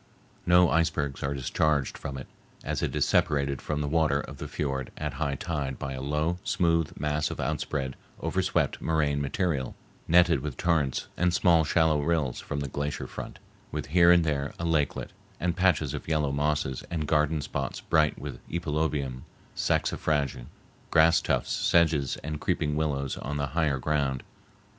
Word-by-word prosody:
No 90 Hz, 0 st, +6 dB
icebergs 80 Hz, -4 st, 0 dB
are 70 Hz, +1 st, -1 dB
discharged 70 Hz, +1 st, 0 dB
from 70 Hz, 0 st, -6 dB
it, 65 Hz, -, -7 dB, 0.4 s
as -, -, -2 dB
it -, -, -1 dB
is -, -, +2 dB
separated 70 Hz, -2 st, +1 dB
from 75 Hz, -1 st, -2 dB
the 75 Hz, -, -1 dB
water 75 Hz, -2 st, +2 dB
of 70 Hz, -1 st, -7 dB
the 75 Hz, -, -6 dB
fiord 70 Hz, -4 st, -3 dB
at -, -, -3 dB
high 70 Hz, -3 st, -1 dB
tide 70 Hz, -4 st, -3 dB
by 70 Hz, 0 st, -4 dB
a 65 Hz, -, -5 dB
low, 75 Hz, +5 st, -1 dB
smooth 85 Hz, -6 st, +1 dB
mass 75 Hz, +1 st, 0 dB
of -, -, -6 dB
outspread, 70 Hz, -2 st, -2 dB, 0.2 s
overswept -, -, 0 dB
moraine 75 Hz, -3 st, +1 dB
material, 70 Hz, -2 st, -1 dB, 0.3 s
netted 85 Hz, -2 st, +5 dB
with 70 Hz, -1 st, -5 dB
torrents 80 Hz, -7 st, +1 dB
and 90 Hz, -1 st, +2 dB
small 85 Hz, -3 st, +4 dB
shallow 80 Hz, -1 st, +2 dB
rills 75 Hz, -5 st, 0 dB
from 70 Hz, -, -4 dB
the 70 Hz, -, -2 dB
glacier 70 Hz, +2 st, -3 dB
front, -, -, -8 dB, 0.3 s
with -, -, -3 dB
here 85 Hz, +2 st, +6 dB
and 90 Hz, -1 st, +6 dB
there 70 Hz, -3 st, -1 dB
a 85 Hz, -, -3 dB
lakelet, 75 Hz, -4 st, 0 dB, 0.3 s
and 85 Hz, -1 st, 0 dB
patches 90 Hz, -6 st, +2 dB
of -, -, -6 dB
yellow 75 Hz, -3 st, +1 dB
mosses 70 Hz, -2 st, -1 dB
and 80 Hz, -3 st, -2 dB
garden 75 Hz, 0 st, +2 dB
spots 70 Hz, -2 st, -3 dB
bright 75 Hz, -2 st, +2 dB
with 70 Hz, 0 st, -7 dB
epilobium, 75 Hz, -5 st, -1 dB, 0.3 s
saxifrage, 70 Hz, -5 st, 0 dB, 0.4 s
grass 80 Hz, 0 st, +5 dB
tufts, -, -, 0 dB
sedges, 80 Hz, -5 st, +2 dB
and 75 Hz, 0 st, -4 dB
creeping 75 Hz, -1 st, 0 dB
willows 70 Hz, -3 st, -1 dB
on 75 Hz, +2 st, -4 dB
the 70 Hz, -, 0 dB
higher 75 Hz, -5 st, +1 dB
ground. 70 Hz, -2 st, -1 dB
75 Hz, 165 wpm, -28 LUFS, 70-80 Hz, 0.4 s, No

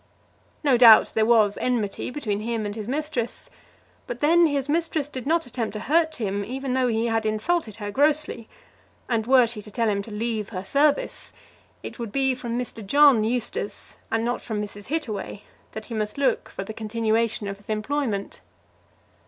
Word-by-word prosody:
No 275 Hz, -4 st, +4 dB
doubt 230 Hz, -3 st, +8 dB
there 220 Hz, 0 st, +2 dB
was 215 Hz, -4 st, +4 dB
enmity 230 Hz, -6 st, -1 dB
between 225 Hz, -7 st, -3 dB
him 225 Hz, 0 st, -2 dB
and 205 Hz, -, -3 dB
his 215 Hz, -1 st, -6 dB
mistress; 275 Hz, -3 st, -3 dB, 0.6 s
but 245 Hz, -, -5 dB
then 335 Hz, +3 st, +5 dB
his 285 Hz, -2 st, -1 dB
mistress 315 Hz, -1 st, 0 dB
did 260 Hz, -3 st, -7 dB
not 330 Hz, 0 st, +2 dB
attempt 240 Hz, -2 st, -4 dB
to 215 Hz, -, -4 dB
hurt 315 Hz, +1 st, +2 dB
him 205 Hz, -5 st, -2 dB
even 260 Hz, +4 st, -4 dB
though 260 Hz, -1 st, +2 dB
he 225 Hz, -1 st, 0 dB
had 225 Hz, -1 st, 0 dB
insulted 220 Hz, -, -1 dB
her 205 Hz, -2 st, -5 dB
grossly; 290 Hz, -3 st, +1 dB, 0.6 s
and 225 Hz, -2 st, -1 dB
were 255 Hz, -1 st, +6 dB
she 225 Hz, -2 st, -6 dB
to 210 Hz, -, -12 dB
tell 230 Hz, +1 st, 0 dB
him 200 Hz, -1 st, +1 dB
to 200 Hz, -, -10 dB
leave 215 Hz, -1 st, -3 dB
her 185 Hz, -3 st, -6 dB
service, 285 Hz, +6 st, +1 dB, 0.5 s
it -, -, -8 dB
would 230 Hz, -3 st, -5 dB
be 265 Hz, +1 st, +2 dB
from 240 Hz, -2 st, -4 dB
Mr. 240 Hz, -3 st, -5 dB
John 280 Hz, +1 st, +5 dB
Eustace, 225 Hz, -2 st, -3 dB
and 225 Hz, +1 st, 0 dB
not 245 Hz, +1 st, -1 dB
from 220 Hz, -3 st, -4 dB
Mrs. 205 Hz, -1 st, -7 dB
Hittaway, 220 Hz, -9 st, -4 dB, 0.3 s
that 220 Hz, 0 st, -7 dB
he 235 Hz, -, -8 dB
must 215 Hz, +1 st, -3 dB
look 270 Hz, -4 st, +1 dB
for -, -, -6 dB
the 220 Hz, -, -7 dB
continuation 220 Hz, 0 st, -1 dB
of 200 Hz, 0 st, -5 dB
his 205 Hz, -, -18 dB
employment. 215 Hz, -1 st, -2 dB
230 Hz, 185 wpm, -24 LUFS, 215-270 Hz, 0.6 s, doubt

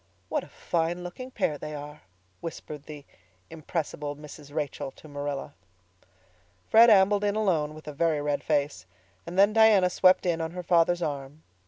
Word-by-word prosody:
"What -, -, -1 dB
a -, -, -12 dB
fine 170 Hz, +1 st, -2 dB
looking 215 Hz, +9 st, -7 dB
pair 150 Hz, -, -1 dB
they 150 Hz, 0 st, -6 dB
are," 150 Hz, +1 st, -9 dB, 0.4 s
whispered 155 Hz, -3 st, -8 dB
the 150 Hz, -2 st, -10 dB, 0.5 s
impressible 150 Hz, -2 st, -4 dB
Mrs. 150 Hz, -1 st, -12 dB
Rachel 145 Hz, -3 st, -3 dB
to -, -, -15 dB
Marilla. 145 Hz, -1 st, -5 dB, 1.1 s
Fred 230 Hz, +2 st, +7 dB
ambled 200 Hz, 0 st, +5 dB
in 205 Hz, 0 st, +1 dB
alone, 165 Hz, -8 st, 0 dB
with 155 Hz, 0 st, -13 dB
a 150 Hz, -, -5 dB
very 160 Hz, +1 st, +1 dB
red 145 Hz, 0 st, -1 dB
face, 140 Hz, -, -1 dB, 0.4 s
and 180 Hz, -, -6 dB
then 200 Hz, +2 st, +5 dB
Diana 215 Hz, -5 st, +5 dB
swept 185 Hz, +1 st, +4 dB
in 170 Hz, -2 st, 0 dB
on 160 Hz, -, -2 dB
her 180 Hz, 0 st, -5 dB
father's 175 Hz, 0 st, +3 dB
arm. 145 Hz, 0 st, -5 dB
160 Hz, 165 wpm, -27 LUFS, 145-180 Hz, 1.1 s, Fred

